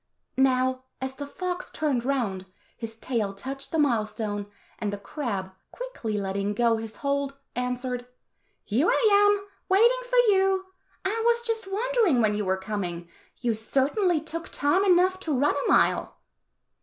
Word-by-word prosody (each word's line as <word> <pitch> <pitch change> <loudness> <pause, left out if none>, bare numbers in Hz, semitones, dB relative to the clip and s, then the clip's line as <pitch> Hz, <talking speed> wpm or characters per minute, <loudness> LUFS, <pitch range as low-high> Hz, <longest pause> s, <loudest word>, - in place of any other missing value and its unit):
Now, 260 -1 +2
as 265 0 -4
the 285 0 -6
fox 360 +4 -4
turned 285 -6 -1
round, 225 -9 -1 0.3
his 225 -1 -7
tail 225 -4 -2
touched 270 +6 -6
the 325 - 0
mile 240 -8 +2
stone, 205 -2 -4 0.3
and 210 -2 -1
the 205 - -3
crab, 200 -5 -4 0.2
quickly 485 - -4
letting 200 +1 -2
go 230 0 +3
his 220 -1 -7
hold, 280 0 0 0.2
answered, 250 0 -2 0.6
"Here 250 +11 +2
I 440 - +4 0.3
am, 400 0 -7 0.2
waiting 465 +6 +5
for - - +2 0.2
you. 385 0 +2 0.4
I 435 +4 0
was 470 0 +3
just 450 -4 -2
wondering 445 - +2
when 215 -2 +3
you 210 0 -1
were 190 0 +1
coming; 185 -4 -4 0.3
you 240 -2 +1
certainly 285 - +1
took 320 +2 -5
time 290 +7 +2
enough 370 0 +4
to 305 -7 -1
run 285 +3 +3
a 285 - -1
mile." - - +3
265 Hz, 155 wpm, -26 LUFS, 220-365 Hz, 0.6 s, waiting